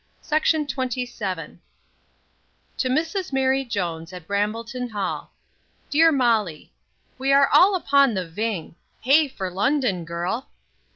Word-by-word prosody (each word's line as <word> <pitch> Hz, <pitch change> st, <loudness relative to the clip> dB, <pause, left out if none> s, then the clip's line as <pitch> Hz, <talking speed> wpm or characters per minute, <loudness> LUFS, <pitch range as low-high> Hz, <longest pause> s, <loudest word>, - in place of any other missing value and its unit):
MELFORD 310 Hz, 0 st, +2 dB
BATH, 255 Hz, -2 st, -2 dB
May 250 Hz, -, -1 dB
10. 190 Hz, -10 st, -6 dB, 1.2 s
To 255 Hz, -, +1 dB
Mrs 325 Hz, +7 st, -1 dB
MARY 265 Hz, 0 st, +2 dB
JONES, 175 Hz, -8 st, -4 dB
at 180 Hz, -3 st, -10 dB
Brambleton 225 Hz, +6 st, -2 dB
hall. 205 Hz, -3 st, -4 dB, 0.6 s
DEAR 325 Hz, +2 st, +5 dB
MOLLY, 225 Hz, -, 0 dB, 0.5 s
We 270 Hz, +1 st, +1 dB
are 275 Hz, 0 st, +6 dB
all 385 Hz, +2 st, +6 dB
upon 280 Hz, -, +3 dB
the 185 Hz, -2 st, -2 dB
ving 205 Hz, 0 st, -3 dB, 0.3 s
Hey 290 Hz, +5 st, +5 dB
for 190 Hz, -8 st, -5 dB
London, 215 Hz, -, 0 dB
girl! 175 Hz, +9 st, -4 dB
245 Hz, 125 wpm, -23 LUFS, 190-275 Hz, 1.2 s, are